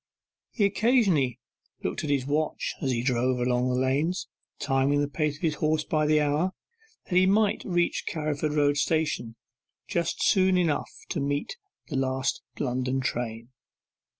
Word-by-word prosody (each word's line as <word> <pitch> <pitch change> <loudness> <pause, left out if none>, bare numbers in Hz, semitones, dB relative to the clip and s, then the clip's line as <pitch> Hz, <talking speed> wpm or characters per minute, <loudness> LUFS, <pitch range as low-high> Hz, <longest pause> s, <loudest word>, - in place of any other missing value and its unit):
He 210 - +1
occasionally 200 - +2 0.5
looked - - -2
at 150 - -3
his 140 -3 +1
watch 150 +2 -1
as 135 - 0
he 120 -2 0
drove 125 0 +1
along 125 +1 +1
the 125 0 +1
lanes, 145 +8 0 0.3
timing 140 +1 +1
the 145 - +1
pace 150 +1 -1
of 145 - -16
his 160 -2 +2
horse 155 0 +2
by 155 -1 0
the 155 0 +4
hour, 150 +5 +1 0.5
that - - -6
he 185 +1 +5
might 205 +1 +2
reach 175 -2 0
Carriford 150 -1 -2
Road 145 -1 +3
Station 150 -7 0 0.5
just 170 -1 -1
soon 190 -2 +4
enough 170 -4 +1 0.2
to - - -2
meet 145 - -2 0.3
the 145 - -2
last 130 0 -1 0.2
London 130 0 -1
train. 115 -2 -3
145 Hz, 155 wpm, -27 LUFS, 130-165 Hz, 0.5 s, he